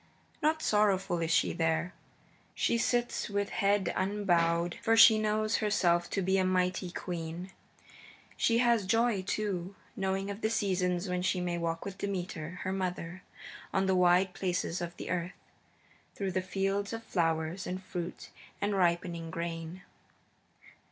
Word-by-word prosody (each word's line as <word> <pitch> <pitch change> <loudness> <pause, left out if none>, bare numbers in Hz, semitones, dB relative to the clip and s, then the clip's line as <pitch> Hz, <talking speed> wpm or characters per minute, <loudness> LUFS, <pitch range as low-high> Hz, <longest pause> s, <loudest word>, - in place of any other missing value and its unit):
Not 315 0 +1
sorrowful 195 -4 +2
is 165 - -1
she 170 - +3
there; 165 +2 0 0.6
she - - +1
sits 240 -1 0
with 200 0 -1
head 200 -3 +1
unbowed, 175 -4 +1
for 225 -1 +3
she 220 -1 +9
knows 215 +1 +1
herself 175 -5 +2
to 195 - -1
be 190 +1 +2
a - - +3
mighty 185 0 +1
queen. 175 +1 -5 0.8
She 230 - +2
has 235 -5 +3
joy, 225 -1 +2
too, 190 -1 -3 0.2
knowing 195 +1 -1
of 200 +2 -7
the 220 - +1
seasons 185 -4 0
when 180 0 -1
she 185 0 +1
may 175 -1 -2
walk 165 -1 -2
with 195 0 -7
Demeter, 180 -3 -4
her 185 - -2
mother, 185 -1 -3 0.5
on 190 0 +1
the 190 - +2
wide 180 +1 +4
places 180 -2 -2
of 175 0 -5
the - - -5
earth, 180 0 -2 0.8
through 195 -2 -2
fields 195 +3 -1
of 225 0 -5
flowers 165 -1 -1
and 185 +1 -4
fruit 175 -2 -6 0.3
and 205 +1 0
ripening 170 -2 0
grain. 165 +2 -5
185 Hz, 145 wpm, -31 LUFS, 175-200 Hz, 0.8 s, she